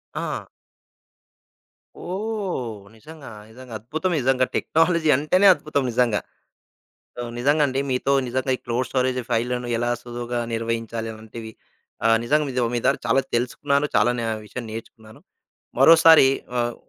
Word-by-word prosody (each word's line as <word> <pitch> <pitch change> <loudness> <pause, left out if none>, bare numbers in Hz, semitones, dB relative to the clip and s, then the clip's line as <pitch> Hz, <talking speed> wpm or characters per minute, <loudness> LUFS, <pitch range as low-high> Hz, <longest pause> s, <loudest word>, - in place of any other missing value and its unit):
ఆ! - - -4 1.5
ఓహ్! 185 - -4
నిజంగా, 150 +4 -12 0.2
నిజంగా. 125 0 -12
అద్భుతం 160 - -3
నిజంగా, 130 0 +2
టెక్నాలజీ 165 -1 +2
అంటేనే, 185 +8 +3
అద్భుతం 145 -3 -2
నిజంగా. 115 -3 +2 1.0
సో, 120 - -4 0.2
నిజంగండి 140 +1 +2
మీతో 130 +2 0 0.2
నిజంగా 130 +2 -1
ఈ - - -23
క్లోడ్ 120 +1 -1
స్టోరేజ్ 130 -1 0
ఫైల్లను, 125 +1 -1
ఎలా 120 +1 0
సులువుగా 120 0 -4
నిర్వహించాలి 115 0 -3
అలాంటివి, 110 +1 -10 0.5
ఆహ్, 115 0 +5
నిజంగా 150 +4 +2
మీ 130 - -6
దో 120 - +2
మీ 120 - 0
దగ్గర - - +2
చాలా 130 +4 +3
తెలుసుకున్నాను. 140 +4 0
చాలాన 120 +3 +2 0.3
విషయం 120 +3 -7
నేర్చుకున్నాను. 110 -1 -11 0.6
మరోసారి 160 -1 +8 0.3
ఆహ్, 120 0 -1
125 Hz, 125 wpm, -23 LUFS, 115-145 Hz, 1.5 s, మరోసారి